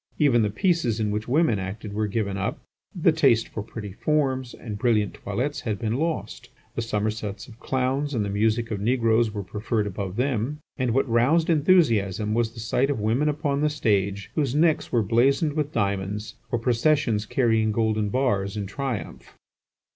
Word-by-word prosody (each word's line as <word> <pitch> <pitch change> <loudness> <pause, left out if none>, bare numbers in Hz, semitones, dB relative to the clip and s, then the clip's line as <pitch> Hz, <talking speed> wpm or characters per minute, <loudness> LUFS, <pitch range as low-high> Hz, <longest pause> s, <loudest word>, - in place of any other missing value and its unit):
Even 135 -6 +4
the 105 - +1
pieces 120 - +1
in 105 -1 0
which 105 +1 -3
women 130 -5 +2
acted 100 +2 -6
were 105 +1 0
given 100 -1 -2
up; 100 0 -2 0.4
the - - +4
taste 115 -1 +3
for 110 - -5
pretty 105 -1 -7
forms 130 -1 0
and 105 -3 -7
brilliant 110 -4 +2
toilettes 125 +9 -3
had 110 -3 -2
been 110 0 -2
lost; 160 +4 -3 0.2
the - - -2
somersaults 105 -2 -3
of 115 0 -15
clowns 135 +3 -1
and 105 -3 0
the - - -3
music 110 +3 0
of 100 -2 -3
negroes 115 -1 +2
were 105 -1 -4
preferred 105 +2 -2
above 95 -1 -4
them, 125 +2 -1 0.2
and 125 -3 -1
what 135 - +2
roused 135 +9 +3
enthusiasm 115 - +3
was 115 0 0
the - - -8
sight 125 +5 0
of 140 - -1
women 115 +8 +1
upon 145 -1 -1
the 150 - +3
stage 100 -8 0
whose 140 -4 0
necks 160 0 +2
were 115 -2 +2
bedizened 135 - +2
with 150 -1 -1
diamonds, 100 -1 -2 0.2
or 120 - +1
processions 115 -2 +1
carrying 110 -3 +2
golden 110 -1 0
bars 100 -5 0
in 105 - -2
triumph. 130 +3 -5
115 Hz, 175 wpm, -25 LUFS, 105-135 Hz, 0.4 s, Even